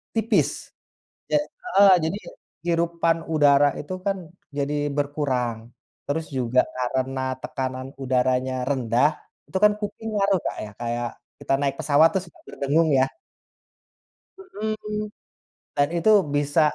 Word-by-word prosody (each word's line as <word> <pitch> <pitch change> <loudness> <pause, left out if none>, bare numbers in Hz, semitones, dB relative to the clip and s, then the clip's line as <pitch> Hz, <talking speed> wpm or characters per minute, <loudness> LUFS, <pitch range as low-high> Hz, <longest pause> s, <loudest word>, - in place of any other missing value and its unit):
tipis. 225 +1 +2 0.8
Ja - - +5 0.3
heeh, 200 - +6
jadi 165 +5 -1 0.5
hirupan 170 0 +1 0.2
udara 145 -2 +5
itu, 150 - -6
kan, 195 -1 +1 0.4
jadi 145 +1 -1 0.2
berkurang, 140 -5 -1 0.5
terus 160 +3 -2
juga 125 0 +2 0.2
karena 130 +1 -1 0.2
tekanan 130 0 -4 0.2
udaranya 130 0 +1 0.2
rendah, 125 0 +2 0.4
itu, - - -2
kan, 210 - +8
kuping 215 +1 -5
ngaruh 195 -2 +3
Kak, - - -3
ya, - - -8
kayak 120 0 -2 0.3
kita - - -1
naik 140 -1 0
pesawat 150 +2 +5
terus 190 -1 -2 0.2
berdengung, 155 +4 +1
ya. 130 - +5 1.3
Mhm. 215 - -4 0.7
Dan 145 0 +3
itu 170 +6 +3 0.2
bisa 145 +2 +2
145 Hz, 120 wpm, -24 LUFS, 130-190 Hz, 1.3 s, kan